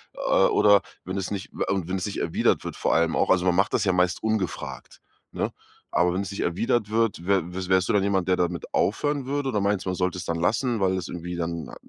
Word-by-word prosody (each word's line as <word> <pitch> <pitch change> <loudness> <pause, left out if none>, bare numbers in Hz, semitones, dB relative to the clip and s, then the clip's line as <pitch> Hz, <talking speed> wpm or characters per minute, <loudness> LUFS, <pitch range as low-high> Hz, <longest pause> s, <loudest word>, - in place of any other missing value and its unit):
äh, - - -12 0.3
oder 100 -1 +5 0.2
wenn 95 +1 -4
es 95 0 -3
nicht 100 -1 -5
äh, - - -2
und 95 -4 -2
wenn 95 - -1
es 95 - -3
nicht 105 - -4
erwidert - - +1
wird, - - -5
vor - - +1
allem 80 0 +2
auch - - +1
also, 90 -1 +3
man 90 -1 +3
macht 95 +3 +2
das - - +2
ja 95 - +2
meist 90 0 +1
ungefragt, 110 -4 -3 0.3
ne, - - -2 0.4
aber 90 0 +2
wenn 95 - -1
es 100 - -5
nicht 100 - -4
erwidert 105 +5 0
wird, 110 -6 0
wä 100 0 +3
w 90 +1 -5
wärst 95 -1 +3
du - - +2
dann 100 -2 +3
jemand, 95 -2 +1
der 90 - +3
damit 85 -1 -2
aufhören 145 +6 0
würde, 140 0 -1
oder 105 -5 0
meinst 100 -1 0
du, - - -1
man 90 - -1
sollte 90 0 -1
es 85 - -6
dann 85 0 -2
lassen, 115 +7 +1
weil 95 -1 +2
es 90 - -4
irgendwie 90 0 -5
dann 85 -1 -3
n - - -10
95 Hz, 260 wpm, -25 LUFS, 90-105 Hz, 0.4 s, oder